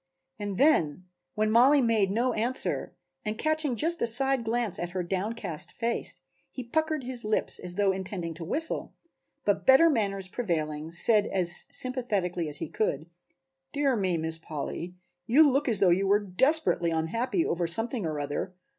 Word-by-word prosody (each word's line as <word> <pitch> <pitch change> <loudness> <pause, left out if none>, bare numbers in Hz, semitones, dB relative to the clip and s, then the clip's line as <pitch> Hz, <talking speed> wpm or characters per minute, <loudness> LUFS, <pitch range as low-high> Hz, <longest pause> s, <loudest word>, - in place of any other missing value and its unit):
And 205 -2 -4
then, 185 - +2 0.3
when 215 0 +1
Mollie 260 +6 +6
made 225 -6 +2
no 235 +5 0
answer 235 +4 -1 0.3
and 215 +1 -3
catching 310 -3 0
just 330 +8 0
a 235 - +2
side 265 +2 +5
glance 230 -3 -1
at 175 0 -5
her 185 -1 -2
downcast 190 -2 -4
face, 235 0 -2 0.3
he 255 - -7
puckered 315 +3 -1
his 245 -1 -2
lips 215 0 0
as 180 -1 -3
though 200 -1 +2
intending 190 -3 -4
to 165 +1 -8
whistle, 315 - -2 0.5
but - - 0
better 270 +5 +7
manners 195 -6 -1
prevailing 160 -8 -3
said 210 +5 +3
as 175 -2 +1
sympathetically 205 -10 -2
as 145 - 0
he - - -4
could: 160 -6 -2 0.6
"Dear 280 -3 +1
me, 185 -5 0
Miss 160 0 -3
Polly, 165 +3 -6 0.3
you 290 +7 +6
look 275 0 +1
as 220 - 0
though 190 - +4
you 190 +3 +2
were 200 +1 +4
desperately 210 - +1
unhappy 170 +5 -1
over 170 0 -1
something 225 +6 -2
or 155 -2 -3
other. 145 +6 -4
210 Hz, 165 wpm, -27 LUFS, 175-250 Hz, 0.6 s, better